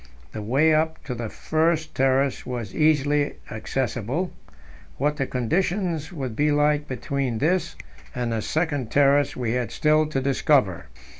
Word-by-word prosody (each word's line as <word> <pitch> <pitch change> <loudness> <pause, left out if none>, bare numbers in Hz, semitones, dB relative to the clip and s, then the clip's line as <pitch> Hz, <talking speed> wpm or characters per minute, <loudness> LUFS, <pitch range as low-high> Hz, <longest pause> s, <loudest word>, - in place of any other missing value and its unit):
The 110 - -6
way 140 +9 +3
up 160 +1 0
to 140 -5 -4
the 115 -2 -5
first 160 +3 0
terrace 135 +1 +1
was 120 -5 -5
easily 145 -1 +2 0.2
accessible; 125 - -2 0.6
what 150 +2 0
the 135 -3 -1
conditions 165 - -1
would 135 -9 -5
be 150 +3 +2
like 150 0 +2
between 130 -1 -2
this 170 +5 0 0.4
and 120 -1 -2
the 110 - -1
second 145 -4 -1
terrace 140 +1 +3
we 120 -3 -2
had 120 -2 -1
still 155 0 +3
to 150 -3 -1
discover. 135 - +1
140 Hz, 145 wpm, -24 LUFS, 125-155 Hz, 0.6 s, way